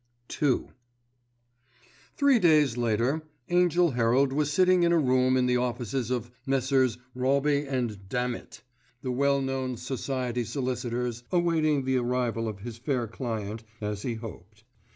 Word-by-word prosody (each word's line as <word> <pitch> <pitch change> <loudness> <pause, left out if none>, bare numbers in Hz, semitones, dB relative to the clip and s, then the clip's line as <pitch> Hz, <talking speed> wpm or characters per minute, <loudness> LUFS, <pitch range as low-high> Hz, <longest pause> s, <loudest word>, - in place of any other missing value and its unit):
*II* 140 -4 +3 1.5
Three 280 -4 +5
days 150 - +4
later 120 +5 +1 0.3
Angell 175 -1 +3
Herald 125 +3 +2
was 145 0 0
sitting 185 +2 +4
in 170 0 +3
a 170 - +4
room 130 -3 +3
in 125 - +2
the 125 0 +2
offices 125 0 -2
of 120 -2 -2
Messrs. 130 -2 +1 0.2
Robbe 140 +2 +1 0.3
& - - -17
Dammitt, 125 -2 -3 0.4
the 130 - -2
well 140 +2 +2
known 130 -2 -2
society 125 -1 -2
solicitors, 125 -2 -3
awaiting 160 -5 +2
the 130 0 +2
arrival 120 -2 -1
of 105 -3 -6
his 115 +1 -7
fair 130 -2 -1
client—as 110 -2 -5
he 120 0 -2
hoped. 110 -2 -10
125 Hz, 130 wpm, -27 LUFS, 120-140 Hz, 1.5 s, Three